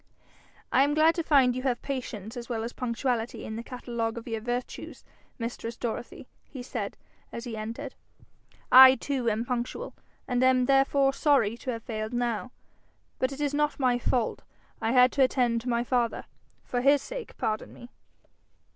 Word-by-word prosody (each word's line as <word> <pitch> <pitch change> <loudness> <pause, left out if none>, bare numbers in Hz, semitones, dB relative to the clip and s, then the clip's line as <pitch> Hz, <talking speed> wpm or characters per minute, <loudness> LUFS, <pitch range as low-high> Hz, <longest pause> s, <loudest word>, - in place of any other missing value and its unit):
'I 265 - +5
am 290 +1 +1
glad 315 +2 +5
to 335 - -2
find 270 -6 +4
you 255 - -3
have 255 -2 0
patience 240 -5 -5
as 240 0 -7
well 225 -2 -2
as 235 - -5
punctuality 240 -1 -2
in 220 - -5
the 230 - -4
catalogue 235 -2 -4
of 230 - -8
your 225 -2 -3
virtues, 245 +2 -5 0.3
mistress 230 -1 -5
Dorothy,' 240 +1 -5 0.2
he 260 -4 -9
said 225 -5 -5 0.3
as 235 - -6
he 240 -3 -5
entered. 230 +6 -6 0.8
'I 260 +1 +10
too 265 -4 -1
am 225 +2 -1
punctual, 245 -1 -3 0.3
and 245 0 +1
am 255 -1 +4
therefore 270 +1 +3
sorry 275 -7 +2
to 255 - -7
have 230 -2 -3
failed 215 0 -4
now, 240 0 -2 0.7
but 260 +1 +1
it 275 - -7
is 290 -1 0
not 295 0 0
my 250 -2 +2
fault: 240 -1 -1 0.4
I 225 0 0
had 250 0 +6
to 275 - +3
attend 245 -2 +1
my 235 -1 +1
father. 240 -2 0 0.4
For 245 - -2
his 280 +1 +4
sake - - -7
pardon 215 0 -2
me.' 240 - -13
245 Hz, 175 wpm, -28 LUFS, 230-265 Hz, 0.8 s, I